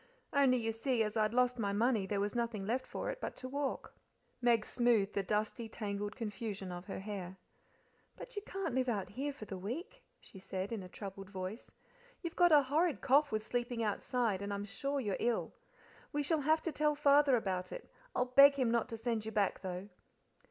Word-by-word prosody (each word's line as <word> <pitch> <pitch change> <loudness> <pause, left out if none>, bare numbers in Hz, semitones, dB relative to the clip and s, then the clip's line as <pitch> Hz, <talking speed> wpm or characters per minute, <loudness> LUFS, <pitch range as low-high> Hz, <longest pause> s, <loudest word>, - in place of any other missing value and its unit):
Only, 275 -3 +5
you 225 -2 -1
see, 225 +1 +1
as 210 0 -3
I'd 215 -1 +2
lost 250 0 +2
my 200 -2 0
money 220 -2 +2
there 200 0 -1
was 205 +1 -1
nothing 230 -4 -2
left 245 +5 -1
for - - -3
it - - -8
but - - -4
to 255 - -6
walk." 280 +1 -3 0.5
Meg 235 -3 +3
smoothed 235 -5 +2
the 200 - +1
dusty, 215 +4 -1
tangled 205 -1 -4
confusion 205 -4 -4
of 175 +1 -6
her 195 - -5
hair. 190 -3 -6 0.8
"But - - -9
you 410 - -2
can't 385 -7 -4
live 255 0 +1
out 200 -5 -1
here 270 +8 -3
for 270 -6 -9
the 190 -2 -6
week," 320 - -5 0.2
she 190 - -13
said, 190 +1 -4
in 225 -3 -3
a 185 - -9
troubled 195 0 -8
voice. 190 +3 -6 0.5
"You've 335 -1 -4
got 350 -1 +5
a 295 -2 +7
horrid 305 +3 +1
cough 285 +3 +4
with 215 0 -1
sleeping 240 -1 -1
outside, 215 -1 0
and 200 0 -3
I'm 200 0 -3
sure 275 +7 -2
you're 205 -7 -1
ill. 240 -1 0 0.6
We 295 0 0
shall 310 +1 +1
have 315 +3 +3
to 330 - -1
tell 300 0 +2
Father 285 -2 +5
about 190 -5 -2
it. - - -7 0.3
I'll 250 - +2
beg 275 +3 +8
him 255 -4 +1
not 235 +1 +1
to 225 - -5
send 225 -1 -1
you 220 - -5
back, 205 -3 +1
though." 185 0 -5
230 Hz, 210 wpm, -34 LUFS, 200-270 Hz, 0.8 s, beg